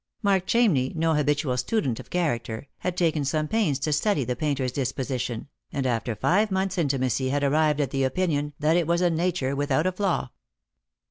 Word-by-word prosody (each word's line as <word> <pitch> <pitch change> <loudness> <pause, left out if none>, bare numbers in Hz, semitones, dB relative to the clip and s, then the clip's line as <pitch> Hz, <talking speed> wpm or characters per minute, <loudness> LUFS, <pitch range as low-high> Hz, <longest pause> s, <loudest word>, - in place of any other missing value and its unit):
Mark 195 -2 +2
Chamney, 180 - +2
no 165 0 +2
habitual 145 -3 +1
student 130 - -1
of - - -10
character, 120 -8 -2
had 180 0 -3
taken 160 -4 +1
some 155 +2 0
pains 185 -9 +1
to 150 +2 -1
study 150 0 +1
the 125 +1 -2
painter's 135 -2 -1
disposition, 130 -2 -3 0.2
and 135 -2 -2
after 120 -2 -1
five 200 - +2
months' 190 -1 -1
intimacy 130 -4 0
had 145 +1 0
arrived 150 +1 +2
at 140 -3 0
the 135 0 0
opinion 145 0 0
that 155 +2 +2
it 170 -3 +2
was 170 +1 +2
a 175 -1 +3
nature 165 -5 0
without 145 +2 +1
a 185 - +2
flaw. 185 -8 -1
150 Hz, 185 wpm, -25 LUFS, 130-175 Hz, 0.2 s, a